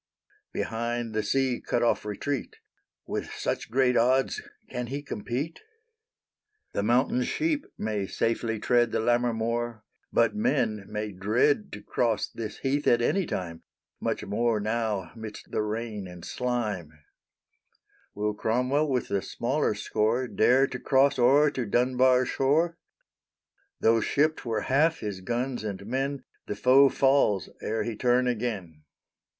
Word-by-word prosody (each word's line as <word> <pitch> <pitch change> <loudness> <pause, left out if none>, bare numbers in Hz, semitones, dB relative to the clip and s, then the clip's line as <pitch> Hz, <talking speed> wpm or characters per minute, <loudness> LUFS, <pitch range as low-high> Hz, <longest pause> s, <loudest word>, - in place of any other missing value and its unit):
Behind 115 0 -2
the 110 - +1
sea 130 +3 0
cut 120 - 0
off 115 - +1
retreat; 130 +7 -3 0.5
With - - -4
such - - -3
great 125 +1 +3
odds 130 +3 +2 0.3
can 125 -1 -4
he 140 +4 -4
compete? 135 +5 -4 1.1
The - - 0
mountain 125 +4 +2
sheep 305 - -1
may 105 -2 -2
safely 115 +1 -1
tread 120 +2 +2
The - - 0
Lammermoor, 120 -1 0 0.3
but 115 - +3
men 110 - 0
may 105 0 -3
dread 115 - +1
To - - -8
cross 115 -4 0
this 110 -2 -6
heath 140 +2 -1
at 120 0 +4
any 190 +7 +1
time; 85 -3 -4 0.4
Much - - -2
more 110 +2 +1
now, 105 -4 -1
midst 110 -2 -9
the - - 0
rain 105 -2 -4
and 90 -1 -10
slime, 110 -10 -2 1.2
Will 105 +1 -1
Cromwell 125 +8 +1
with 130 -2 0
the 100 -1 0
smaller - - -1
score 115 +4 0
Dare 125 +4 +4
to 125 -2 -6
cross 135 0 +3
o'er 140 +4 +5
to 130 - -2
Dunbar 125 +3 +3
shore? 160 +7 +1 1.0
Tho' 115 0 +4
shipped 155 +5 +1
were 110 -2 0
half 155 +7 +2
his 100 -3 -4
guns 120 +4 -2
and 100 -2 -5
men 135 +3 -2 0.2
The 105 - -3
foe 130 +5 +6
falls 135 - +2
ere 110 +1 -1
he 115 - -3
turn 125 +1 +2
again. 105 -10 -3
120 Hz, 140 wpm, -27 LUFS, 105-130 Hz, 1.2 s, foe